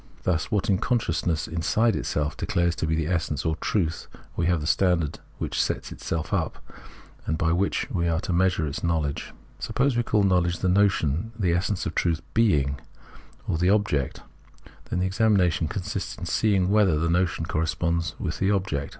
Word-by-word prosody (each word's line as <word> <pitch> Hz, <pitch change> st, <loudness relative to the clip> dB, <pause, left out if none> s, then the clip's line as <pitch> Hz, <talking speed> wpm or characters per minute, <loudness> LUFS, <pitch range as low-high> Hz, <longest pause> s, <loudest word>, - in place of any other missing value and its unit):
Thus 85 Hz, -3 st, +1 dB
in -, -, -22 dB
what 100 Hz, -3 st, +1 dB
consciousness 85 Hz, -9 st, 0 dB
inside 105 Hz, +8 st, +1 dB
itself 75 Hz, 0 st, -1 dB
declares 85 Hz, -1 st, 0 dB
to 80 Hz, -, -1 dB
be 80 Hz, -, +1 dB
the 80 Hz, -1 st, 0 dB
essence 80 Hz, -4 st, -1 dB
or 80 Hz, 0 st, +1 dB
truth 85 Hz, -1 st, -1 dB, 0.3 s
we 85 Hz, -, 0 dB
have 90 Hz, -2 st, +2 dB
the 75 Hz, -, -5 dB
standard 85 Hz, -3 st, +1 dB, 0.2 s
which -, -, -3 dB
itself 80 Hz, -1 st, -4 dB
sets -, -, -6 dB
up, -, -, -1 dB, 0.7 s
and 80 Hz, -, 0 dB
by 80 Hz, 0 st, +1 dB
which 95 Hz, +4 st, 0 dB
we 85 Hz, -2 st, 0 dB
are 80 Hz, -1 st, +1 dB
to 90 Hz, -, -2 dB
measure 90 Hz, -2 st, +2 dB
its 70 Hz, -1 st, -3 dB
l^TL0wledge. 80 Hz, -4 st, -1 dB, 0.3 s
Suppose 135 Hz, -1 st, 0 dB
we 120 Hz, -, +3 dB
call 110 Hz, -3 st, +1 dB
knowledge 90 Hz, -2 st, +2 dB
the 95 Hz, -, 0 dB
notion, 100 Hz, 0 st, +2 dB
and 110 Hz, -, -5 dB
the 85 Hz, -2 st, +3 dB
essence 90 Hz, +2 st, -1 dB
or -, -, -1 dB
truth 85 Hz, -1 st, 0 dB
"being" 75 Hz, -12 st, +2 dB, 0.7 s
or 80 Hz, -, 0 dB
the 90 Hz, +2 st, +3 dB
object, 100 Hz, -10 st, +1 dB, 0.7 s
then -, -, -1 dB
the 90 Hz, -, +1 dB
examination 95 Hz, -4 st, +2 dB
consists 95 Hz, +2 st, -4 dB
in 90 Hz, -, -6 dB
seeing 95 Hz, 0 st, +2 dB
whether 100 Hz, -7 st, +4 dB
the 80 Hz, +2 st, 0 dB
notion 85 Hz, -1 st, +1 dB
corresponds 85 Hz, -1 st, -1 dB
with -, -, -3 dB
the 95 Hz, -, +2 dB
object. 95 Hz, -8 st, -1 dB
85 Hz, 185 wpm, -25 LUFS, 80-95 Hz, 0.7 s, whether